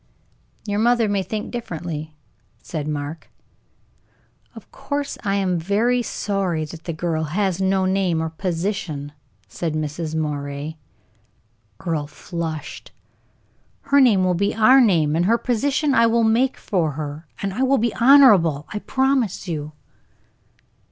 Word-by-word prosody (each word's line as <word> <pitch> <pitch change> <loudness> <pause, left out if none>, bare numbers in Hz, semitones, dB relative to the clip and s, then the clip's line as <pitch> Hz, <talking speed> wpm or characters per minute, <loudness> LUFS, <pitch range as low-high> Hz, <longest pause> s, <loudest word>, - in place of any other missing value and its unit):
"Your 205 -1 -1
mother 235 0 +3
may 200 -1 0
think 210 +2 -5
differently," 160 -9 -5 0.5
said 155 -3 -5
Mark. 150 +1 -5 1.3
"Of - - -13
course 285 -1 -4
I 200 -2 0
am 185 -3 0
very 220 +8 +1
sorry 195 -8 -2
that 160 +2 -11
the 170 - -2
girl 160 -1 -2
has 190 +3 -1
no 190 0 +2
name 185 -3 +1
or 160 0 -2
position," 170 -4 -3 0.4
said 165 -3 -4
Mrs. 155 +1 -3
Moray. 145 0 -3 1.0
Earle 155 -4 -2
flushed. 160 -1 -6 0.9
"Her 280 0 +3
name 215 -8 +4
will 185 0 +2
be 200 +4 0
our 255 +5 +6
name, 165 -10 +3
and 170 +2 +2
her 230 +4 +3
position 275 +5 0
I 230 -2 +5
will 230 0 +2
make 235 +4 +2
for 165 -7 -1
her; 150 +2 -6
and 195 -1 -3
it 260 +5 0
will 275 +1 +3
be 235 -1 0
honorable, 210 - +5
I 210 - -2
promise 265 -6 0
you." 155 -2 -4
185 Hz, 140 wpm, -22 LUFS, 160-225 Hz, 1.3 s, our